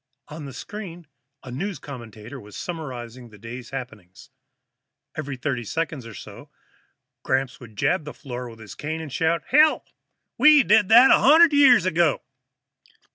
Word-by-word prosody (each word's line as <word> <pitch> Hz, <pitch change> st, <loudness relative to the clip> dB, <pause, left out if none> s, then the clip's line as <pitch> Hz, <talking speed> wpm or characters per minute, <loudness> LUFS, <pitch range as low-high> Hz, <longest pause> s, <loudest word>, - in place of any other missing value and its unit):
On 150 Hz, 0 st, -8 dB
the 135 Hz, -, -8 dB
screen, 175 Hz, -1 st, -9 dB, 0.4 s
a 130 Hz, -, -9 dB
news 190 Hz, +8 st, -4 dB
commentator 120 Hz, -2 st, -10 dB
was 105 Hz, -2 st, -12 dB
summarizing 125 Hz, -7 st, -7 dB
the 105 Hz, -, -16 dB
day's 120 Hz, +3 st, -9 dB
happenings. 110 Hz, -9 st, -10 dB, 0.8 s
Every 145 Hz, -4 st, -6 dB
thirty 130 Hz, -2 st, -3 dB
seconds 150 Hz, 0 st, -4 dB
or 110 Hz, -, -11 dB
so, -, -, -12 dB, 0.7 s
Gramps 130 Hz, 0 st, -2 dB
would 115 Hz, -4 st, -14 dB
jab 175 Hz, -, 0 dB
the 150 Hz, -, -7 dB
floor 125 Hz, -3 st, -7 dB
with 115 Hz, -, -13 dB
his 110 Hz, -2 st, -11 dB
cane 155 Hz, +2 st, -5 dB
tip -, -, -6 dB
and 145 Hz, -4 st, -9 dB
shout, 160 Hz, +1 st, 0 dB
"Hell, 305 Hz, +3 st, +4 dB, 0.5 s
we 300 Hz, -2 st, +7 dB
did 210 Hz, -3 st, +3 dB
that 240 Hz, +4 st, +7 dB
a -, -, +6 dB
hundred 315 Hz, +3 st, +6 dB
years 260 Hz, -9 st, +6 dB
ago!" 170 Hz, -4 st, +1 dB
145 Hz, 160 wpm, -23 LUFS, 120-180 Hz, 0.8 s, we